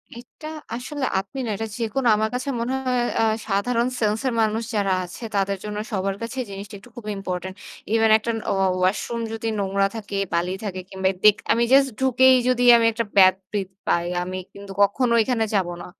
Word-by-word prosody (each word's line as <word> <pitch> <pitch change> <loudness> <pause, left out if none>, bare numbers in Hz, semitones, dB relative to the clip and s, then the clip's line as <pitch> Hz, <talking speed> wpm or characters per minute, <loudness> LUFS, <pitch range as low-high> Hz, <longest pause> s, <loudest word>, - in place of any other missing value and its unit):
এটা 245 +6 -11 0.3
আসলে 265 +3 -4
আপনি 195 +8 -8 0.2
এটা 225 - -3
যেকোনো 240 +2 -1
আমার 220 +1 0
কাছে 255 +3 -3
মনে 240 +3 -2
হয় 250 -1 +1 0.2
আ - - +3 0.2
সাধারণ 230 +4 +1
সেন্স 215 -1 +1
এর 250 - 0
মানুষ 220 +1 0
যারা 200 -2 +1
আছে 180 +6 -9
তাদের 195 0 0
জন্য 210 0 -5
সবার 195 -1 -1
কাছে 235 +3 -5
জিনিসটা 200 +1 -8 0.2
খুবই 215 -4 -6
ইম্পোর্টেন্ট। 185 -1 -5 0.4
ইভেন 225 -1 +4
একটা 230 +1 -3
ন - - -3
ও - - +2 0.3
ওয়াশরুম 210 +5 0
যদি 225 0 -4
নোংরা 195 0 +1
থাকে, 205 -2 -6 0.2
বালি 175 +2 0
থাকে 185 -3 -4
কিংবা 190 0 0
দেখ 210 -1 +7 0.2
আমি 235 - +3
জাস্ট 275 0 +6
ঢুকেই 260 0 +5
যদি 250 -1 +2
আমি 230 - +2
একটা 230 0 -2
ব্যাড 185 -1 +7 0.2
ব্রিথ 195 -3 -2 0.2
পাই 170 0 +2 0.2
আমি 185 +1 -5 0.2
কিন্তু 200 0 -10
কখনো 235 +4 +3
এখানে 225 -1 0
যাবো 185 -3 +1
না। - - -8
215 Hz, 190 wpm, -23 LUFS, 195-240 Hz, 0.4 s, দেখ